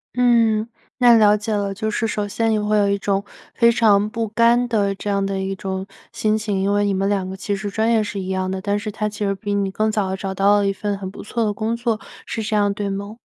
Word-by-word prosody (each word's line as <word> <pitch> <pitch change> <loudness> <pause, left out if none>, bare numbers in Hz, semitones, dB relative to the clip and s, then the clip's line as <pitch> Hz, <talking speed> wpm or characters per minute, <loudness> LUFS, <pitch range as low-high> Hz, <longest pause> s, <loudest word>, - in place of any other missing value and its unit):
嗯， 230 -3 +3 0.3
那 240 -2 +7
了 210 -1 +6
解 210 +1 -4
了。 200 -1 -1
就 220 +2 -3
是 220 +1 -1
首 210 -1 -2
先 225 +2 0
你 215 - +2
会 210 0 +1
有 200 -1 +3
一 200 - +1
种 200 0 0 0.3
非 235 -1 +5
常 210 -3 +3
不 230 -1 -2
甘 235 +3 +3
的 205 -4 +1
这 205 +1 -6
样 200 -1 +1
的 195 -1 -2
一 190 0 -3
种 190 0 -4 0.2
心 215 0 0
情， 210 -3 -2
因 195 +1 +1
为 205 0 +2
你 200 - +1
们 195 +1 0
两 195 -2 0
个 190 - -6
其 195 +1 -3
实 200 +1 -5
专 220 +2 +1
业 225 -2 +3
是 205 -1 -5
一 185 - -5
样 185 0 -1
的， 190 - -3
但 205 +1 0
是 215 0 -4
他 210 0 -2
其 210 0 -4
实 195 - +1
比 205 +1 -3
你 195 -1 0
更 215 +2 0
早 205 -3 -1
地 190 - -1
找 195 0 -4
到 200 +2 +3
了 200 - +1
一 195 - +1
份 205 0 -3
很 190 -1 -6
不 - - -10
错 230 +2 -2
的 210 - +1
工 220 +3 -2
作， 230 -2 -1 0.3
是 225 - -3
这 215 0 -1
样 205 -1 +2
对 205 -1 -3
吗？ 200 +3 -6
205 Hz, 300 characters per minute, -21 LUFS, 195-220 Hz, 0.3 s, 那